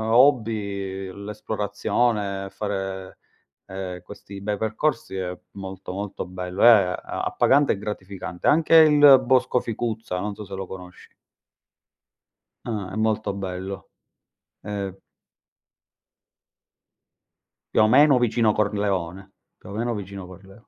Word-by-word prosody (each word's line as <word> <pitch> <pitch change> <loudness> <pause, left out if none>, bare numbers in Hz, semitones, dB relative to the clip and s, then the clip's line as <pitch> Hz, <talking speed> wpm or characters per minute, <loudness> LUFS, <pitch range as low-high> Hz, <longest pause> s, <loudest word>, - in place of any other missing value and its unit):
hobby, 105 -7 +2
ehm, 100 +2 -9
l'esplorazione, 105 -1 -1
fare, 95 -2 -5 0.5
ehm, 95 -2 -6
questi 100 +1 -11
bei 105 0 -1
percorsi 110 0 -1
è 90 -1 -4
molto, 95 -1 -8
molto 100 -1 -5
bello. 90 +1 -5
È - - +9
a 100 -5 +5 0.3
appagante 140 +1 +3
e - - -5
gratificante. 95 -3 -5
Anche 160 +2 +4
il 145 -4 +8
bosco 125 -1 +3
Ficuzza, 115 -4 -4
non 105 +1 -3
so 105 - -8
se 95 - -11
lo 95 0 -5
conosci. 90 -1 -11 1.6
Ah, 105 -5 -4
è - - -7
molto 110 -2 0
bello. 95 -1 -6 0.7
Ehm 100 -2 -5 2.8
Più - - +4
o 110 - +5
meno 145 +3 +6
vicino 115 -2 +2
Corleone. 100 -3 -1 0.3
Più - - -14
o - - -7
meno 120 +2 -1
vicino 100 -2 -7
Corleo 95 +4 -15
100 Hz, 120 wpm, -24 LUFS, 95-110 Hz, 2.8 s, È